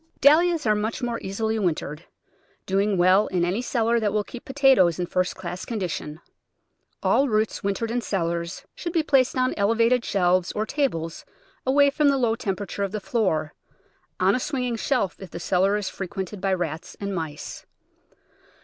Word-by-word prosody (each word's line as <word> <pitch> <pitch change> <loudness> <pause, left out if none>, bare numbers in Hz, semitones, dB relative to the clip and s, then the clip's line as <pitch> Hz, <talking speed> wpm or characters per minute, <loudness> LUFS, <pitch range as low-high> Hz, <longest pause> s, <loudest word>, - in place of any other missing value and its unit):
Dahlias 320 +2 +5
are 215 - +4
much 215 +4 -2
more 235 -1 -1
easily 220 +3 -2
wintered, 165 -4 -2 0.6
doing 195 +1 +1
well 185 +3 +4
in 175 -2 0
any 190 +7 -1
cellar 235 -1 +1
that 210 -2 0
will 210 0 0
keep 240 +3 -10
potatoes 265 - +4
in 180 - -1
first 180 +1 -1
class 180 0 -6
con 230 -3 -4
dition. 160 -4 -4 0.9
All 275 0 +3
roots 215 -1 0
wintered 200 +3 -1
in 245 +1 0
cellars 170 -4 -2
should 340 -2 -5
be 330 -3 +2
placed 265 -4 +2
on 255 0 +2
elevated 230 +4 +3
shelves 185 -2 +1
or 215 - -1
tables 170 - -2 0.4
away 280 +1 +5
from 295 0 +3
the 275 - +2
low 235 -3 +2
tem 210 -5 -2
perature 200 +1 -4
of 200 0 -3
the 215 - -1
floor— 190 -9 0 0.7
on 190 +2 +4
a 250 - +1
swinging 250 -3 -2
shelf, 230 -4 0
if 190 - -9
the 170 - -7
cel 180 +2 +1
lar 200 +2 +3
is 205 -2 -3
frequented 190 0 -5
by 195 - 0
rats 170 -3 -3
and 200 -1 -3
mice. 160 -4 -6
205 Hz, 180 wpm, -24 LUFS, 185-245 Hz, 0.9 s, Dahlias